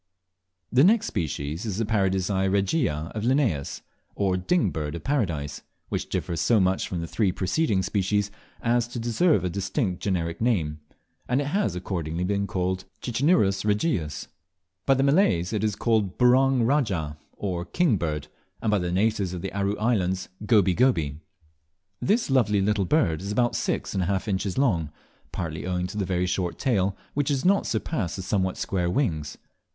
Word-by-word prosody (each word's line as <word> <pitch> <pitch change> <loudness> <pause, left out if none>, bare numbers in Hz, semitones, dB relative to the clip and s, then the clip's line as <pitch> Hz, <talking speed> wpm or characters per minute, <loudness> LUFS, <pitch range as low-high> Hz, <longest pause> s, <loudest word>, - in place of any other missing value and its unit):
The 125 +3 +5
next 210 +5 +5
species 75 -2 -3
is 105 -4 -3
the 115 - 0
Paradisea 95 -2 +1
regia 95 - 0
of 110 - -4
Linnaeus, 120 - 0 0.3
or 95 -2 +1
Ding 150 - +1
Bird 75 0 -3
of 85 - -7
Paradise, 85 - -1 0.3
which - - -3
differs 85 -4 -2
so 115 - +4
much 95 0 +1
from 90 -2 -3
the 85 - -4
three 100 +2 +1
preceding 95 - 0
species 100 +1 0 0.3
as 120 0 +2
to 120 - -7
deserve 120 - +2
a 90 - 0
distinct 95 - -2
generic 85 -3 -2
name, 85 -11 +1 0.5
and 125 +2 +2
it 145 - -1
has 195 - +1
accordingly 85 -2 -3
been 100 +1 0
called 90 0 -2 0.2
Cicinnurus 120 - +2
regius. 105 - -1 0.6
By 135 - +5
the 135 - +2
Malays 140 - +3
it 110 - -1
is 105 -2 +1
called 110 -6 0
"Burong 130 0 +4
rajah," 95 - 0
or 90 -4 -3
King 120 - +1
Bird, 75 -4 -3 0.3
and 110 - 0
by 105 - +3
the 90 -1 -2
natives 100 -1 +1
of 90 - -6
the 95 - -4
Aru 100 +1 -1
Islands 95 -5 0 0.2
"Goby 100 -6 +4
goby." 80 - +1 0.8
This 215 - +1
lovely 105 -6 +3
little 100 0 +1
bird 85 - +2
is - - -7
only 105 - -2
about 120 +1 +1
six - - -2
and 95 - 0
a 90 - 0
half 95 +1 -1
inches 95 -1 -1
long, 95 - +2 0.4
partly 80 0 -4
owing 90 -1 -1
to 95 +3 -6
the 100 - 0
very 90 0 0
short 90 -1 -1
tail, 100 -7 +1 0.2
which 145 -1 0
does 140 -1 0
not 195 +2 +3
surpass 105 - -2
the 95 - -5
somewhat 95 -1 0
square 90 -3 -1
wings. 80 - -1
100 Hz, 175 wpm, -26 LUFS, 90-120 Hz, 0.8 s, The